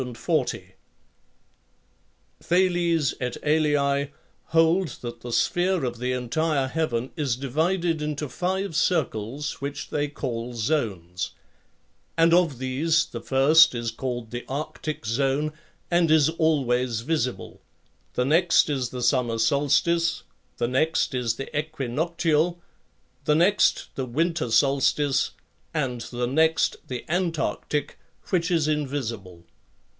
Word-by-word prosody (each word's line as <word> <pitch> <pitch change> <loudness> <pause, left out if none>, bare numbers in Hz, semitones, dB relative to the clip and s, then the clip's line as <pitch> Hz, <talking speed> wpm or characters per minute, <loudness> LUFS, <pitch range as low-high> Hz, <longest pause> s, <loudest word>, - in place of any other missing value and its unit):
Thales 175 -4 +2
et 125 -1 -2
al. 145 -2 +2 0.4
hold 165 +3 +3
that 120 -1 -7
the 120 - -7
sphere 175 +4 +1
of 120 -1 -4
the 125 +1 -1
entire 135 +3 0
heaven 130 -5 -2
is 140 -6 0
divided 160 +5 0
into 150 0 -3
five 185 +3 -2
circles 145 - -1
which 140 +1 -5
they 145 0 0
call 125 -4 -5
zones; 105 - -2 0.8
and 165 0 +5
of 170 -6 +3
these 140 +6 +1
the 115 - -8
first 140 +4 +5
is 115 -1 -2
called 120 -1 -5
the 120 0 -5
arctic 150 0 -4
zone, 135 +6 0 0.4
and 170 -1 +3
is 155 -1 +5
always 130 -8 +1
visible, 130 -2 -3 0.5
the 125 - +1
next 165 +2 +4
is 130 -4 -1
the 125 -1 -5
summer 120 -2 +2
solstice, 145 +7 +2 0.3
the 120 - 0
next 155 +5 +1
is 125 -3 0
the 135 - -7
equinoctial, 155 +3 0 0.7
the 150 - +3
next 185 +5 +3
the 130 -1 -4
winter 160 +1 0
solstice, 140 +2 +2 0.5
and 130 -6 -1
the 120 0 -2
next 160 +5 +2
the 125 -2 -5
antarctic, 165 -4 -2 0.3
which 175 -2 +1
is 165 -4 +2
invisible. 120 - -3
145 Hz, 115 wpm, -25 LUFS, 125-160 Hz, 0.8 s, and